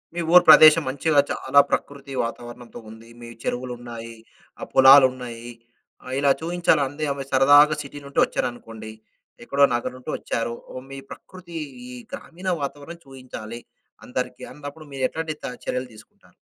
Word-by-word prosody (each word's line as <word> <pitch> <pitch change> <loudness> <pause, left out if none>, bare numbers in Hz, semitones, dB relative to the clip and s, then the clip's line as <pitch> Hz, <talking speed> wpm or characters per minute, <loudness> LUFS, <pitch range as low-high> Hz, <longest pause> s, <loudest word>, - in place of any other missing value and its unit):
మీ 175 - -2
ఊరు 180 - +8
ప్రదేశం 155 +1 +8
మంచిగా 145 +2 +1
చాలా 140 +2 +2
ప్రకృతి 140 -1 -4
వాతావరణంతో 120 +1 -8
ఉంది. 110 +1 -14
మీ 120 - -10 0.2
చెరువులున్నాయి, 120 -2 -6 0.4
ఆహ్, - - -7
పొలాలున్నాయి, 130 -3 +5 0.5
ఆహ్, 130 - -7
ఇలా 140 -1 +3
చూయించాలంది. 155 -4 0
ఆమె 140 - -6
సరదాగా 145 +3 +6
సిటీ 145 +1 -10
నుండి 140 - -2
వచ్చారనుకోండి 115 -2 -6 0.5
ఎక్కడో 140 +3 +1
నగరం 120 +1 -4
నుండి 130 - -7
వచ్చారు. 115 0 -3 0.2
ఓహ్! 130 - -8
మీ 135 - -7
ప్రకృతీ, 175 -3 -11 0.3
ఈ - - -9 0.2
గ్రామీణ 180 +3 -9
వాతావరణం 145 +4 -7
చూయించాలి. 120 -3 -9 0.4
అందరికీ 125 0 -5
అన్నప్పుడు 150 +1 -10
మీరెట్లాంటి 155 +4 -3
త - - -3 0.2
చర్యలు 125 0 -4
తీసుకుంటారు? 110 - -20
135 Hz, 135 wpm, -23 LUFS, 120-145 Hz, 0.5 s, ఊరు